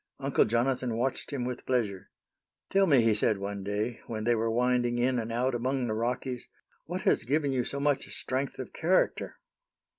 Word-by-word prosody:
Uncle 135 0 +3
Jonathan 120 +1 0
watched 130 +2 -1
him 130 -4 -2
with 125 0 -4
pleasure. 110 -7 -1 0.6
"Tell 195 0 +4
me," 140 -7 +6
he 115 -1 +4
said 105 0 +2
one 100 0 -4
day, 105 +4 -2
when 110 -2 -4
they 120 +2 +3
were 115 0 0
winding 120 +1 +2
in 125 +1 +2
and 115 0 -4
out 125 +3 +1
among 130 +2 0
the 110 - -1
Rockies, 125 +2 -2 0.4
"what - - -3
has - - +3
given 140 +4 +1
you 130 -2 +1
so 140 - -3
much 140 -1 +1
strength 130 +1 -3
of 130 - -7
character?" 175 +4 +1
125 Hz, 185 wpm, -29 LUFS, 115-130 Hz, 0.6 s, me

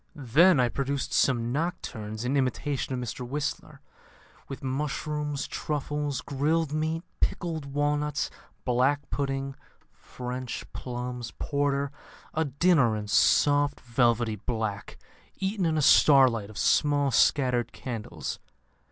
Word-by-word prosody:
"Then 150 +5 +4
I 125 - +4
produced 140 +2 -2
some 120 -3 +2
Nocturnes 120 -8 -3
in 130 +3 0
imitation 135 +1 -1
of - - -3
Mr 125 0 -5
Whistler, 145 +4 -4 0.7
with 135 - -8
mushrooms, 145 +1 -2
truffles, 145 -2 -3
grilled 150 +2 0
meat, 160 +2 -1 0.2
pickled 160 -5 -1
walnuts, 145 +1 -1 0.3
black 130 +4 +2
pudding, 135 -1 -2 0.4
French 125 0 -6
plums, 125 -1 -5
porter 140 -1 0 0.4
a 160 +1 +1
dinner 140 -4 +3
in 105 -1 -6
soft 145 +7 +3
velvety 120 -2 +1
black, 110 -1 -4 0.4
eaten 195 -2 -1
in 160 -1 +1
a 150 - +1
starlight 130 -9 +5
of 110 - -11
small 145 -2 +3
scattered 125 -1 +3
candles. 115 -5 -6
140 Hz, 115 wpm, -27 LUFS, 125-150 Hz, 0.7 s, starlight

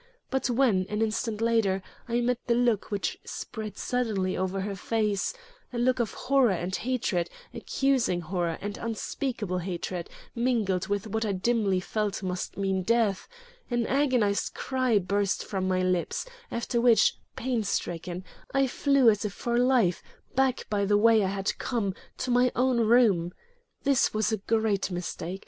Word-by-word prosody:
But 265 -1 0
when, 230 -7 +2
an 210 - -2
instant 220 0 -2
later, 220 -5 +2 0.3
I 240 +1 +1
met 245 0 +1
the 235 - +3
look 240 -4 +1
which 200 -6 -2
spread 215 -2 -6
suddenly 215 -7 -1
over 190 +1 -1
her 200 +1 -3
face 210 0 0 0.4
a 245 - -5
look 255 +1 +2
of 230 -4 -1
horror 265 -2 +3
and 180 +1 -2
hatred, 215 -9 -1 0.2
accusing 260 -10 +1
horror 170 -1 -2
and 205 0 -5
unspeakable 225 -4 -3
hatred 180 -1 -4 0.2
mingled 225 -7 0
with 205 0 -1
what 220 +1 -2
I 210 -2 0
dimly 200 -1 +1
felt 205 +1 -2
must 180 -1 -3
mean 195 -1 0
death 220 -1 +1 0.4
an 240 -2 0
agonized 250 -7 +1
cry 255 -4 +1
burst 200 +1 0
from 190 -2 -2
my 185 0 +1
lips, 180 - 0 0.2
after 235 0 -1
which, 230 -3 +5 0.2
panicstricken, 190 -8 -2 0.3
I 275 0 +4
flew 275 0 +3
as 210 -1 +4
if 210 -2 -3
for 235 +2 -1
life, 245 -8 +3 0.3
back 265 -1 +1
by 205 -2 0
the 205 +1 +3
way 220 0 +5
I - - +1
had 195 0 -1
come, 220 -6 -1 0.2
to 255 - -2
my 245 0 +4
own 250 -1 +2
room. 215 -7 +4 0.5
This 275 -5 +2
was 215 +1 +1
a 220 - +1
great 215 -1 0
mistake. 180 0 -4
215 Hz, 160 wpm, -28 LUFS, 190-240 Hz, 0.5 s, which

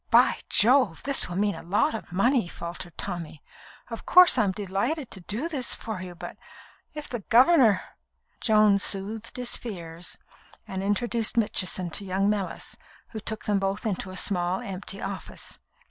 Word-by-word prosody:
"By - - +4
Jove! 235 -6 +3
this 275 -7 +6
will 175 - -5
mean 205 +1 +1
a - - -9
lot 205 - +1
of 220 - -7
money," 235 +3 +2
faltered 170 0 -8
Tommy. 170 -5 -6 0.5
"Of 230 - -6
course, 365 0 +7
I'm 200 -3 +2
delighted 210 - -3
to - - -5
do 215 - -3
this 280 -7 -1
for 220 -4 -6
you, 180 -1 -8
but 170 - -9 0.6
if 300 -1 -6
the 240 - -5
governor 240 - +4 0.3
" - - -43
Joan 215 -3 +4
soothed 210 +5 +1
his 250 -1 -1
fears; 170 -6 -6 0.5
and 190 -2 -4
introduced 225 +3 0
Mitchison 185 -5 +1
to 200 - +1
young 195 +2 0
Mellis, 200 -3 -4 0.3
who 220 - -7
took 220 0 -5
them 205 -1 +1
both 195 +2 -2
into 190 -3 -3
a 185 - -5
small, 180 -1 +1
empty 195 +1 -3
office. 195 -1 -6
205 Hz, 165 wpm, -26 LUFS, 185-230 Hz, 0.6 s, course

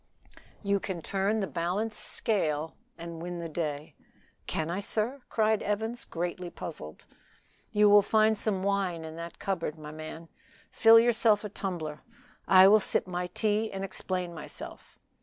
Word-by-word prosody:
"You 200 0 +2
can 185 -4 -5
turn 200 +3 0
the - - 0
balanced 190 +6 -2
scale 160 -8 -1 0.2
and 170 -1 -7
win 175 +1 -5
the 170 -1 -4
day!" 150 -2 -4 0.5
"Can 160 +1 -2
I, 180 - -2
sir?" 225 +6 -2
cried 220 -1 +2
Evans, 220 +3 -2
greatly 175 +1 -4
puzzled. 75 - -8 0.7
"You 210 0 +5
will 205 0 +8
find 220 +1 +3
some 200 -3 -1
wine 190 -5 0
in 160 0 -8
that 170 0 -7
cupboard, 170 -5 -3
my 150 -1 -8
man; 155 +1 -8 0.4
fill 225 0 +7
yourself 225 -2 +3
a 210 - -4
tumbler. 170 -7 -4 0.5
I 190 0 +8
will 215 +2 +7
sip - - 0
my 180 -1 -3
tea, 215 +3 0
and 195 0 -4
explain 185 -2 -3
myself. 155 -2 -9
190 Hz, 155 wpm, -29 LUFS, 170-210 Hz, 0.7 s, will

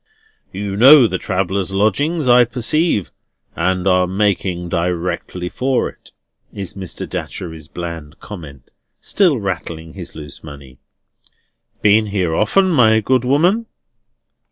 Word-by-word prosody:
"You 100 0 -4
know 130 +5 +8
the 95 -4 -1
travellers' 95 +1 -2
lodging, 130 - 0
I 125 0 +7
perceive, 125 - 0 0.4
and 95 0 0
are 90 -1 +3
making 95 -2 -1
directly 90 +1 -2
for 130 +7 -1
it," - - -17 0.4
is 95 -4 -7
Mr. 95 -3 -6
Datchery's 80 -4 -6
bland 85 -3 -7
comment, 75 - -11 0.3
still 175 - +2
rattling 85 -5 -5
his 90 -3 -9
loose 75 -2 -8
money. 70 -4 -12 1.0
"Been 105 +1 +4
here 95 -5 -1
often, 185 - +2
my 110 -7 +4
good 125 +3 +1
woman?" 175 - +2
95 Hz, 120 wpm, -18 LUFS, 85-125 Hz, 1.0 s, know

